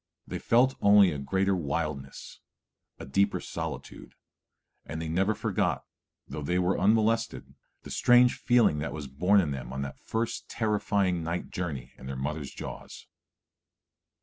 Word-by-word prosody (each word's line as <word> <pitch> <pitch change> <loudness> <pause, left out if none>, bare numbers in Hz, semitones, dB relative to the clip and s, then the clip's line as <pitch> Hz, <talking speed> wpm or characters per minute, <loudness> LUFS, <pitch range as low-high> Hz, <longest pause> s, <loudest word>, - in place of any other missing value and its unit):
They - - -5
felt 125 +3 +3
only 100 -2 +6
a 75 - -4
greater 95 +8 +1
wildness, 70 -4 -4 0.6
a - - -8
deeper 100 +9 +1
solitude; - - -7 0.7
and 80 - -6
they 80 - -4
never 95 +6 +1
forgot, - - -1 0.4
though 75 - -6
they 85 +5 0
were 90 +1 +1
unmolested, 110 +3 +1 0.3
the - - -9
strange 125 0 +5
feeling 120 -11 +3
that 70 -2 -3
was 75 -2 -5
born 90 +10 +3
in 80 -7 0
them 65 -3 -5
on 65 +1 -3
that 70 -1 -7
first 115 +1 -3
terrifying 100 -5 0
night 85 +2 -4
journey 75 -9 -4
in 65 - -9
their 65 - -4
mother's 70 +2 -4
jaws. - - -9
90 Hz, 150 wpm, -28 LUFS, 70-105 Hz, 0.7 s, only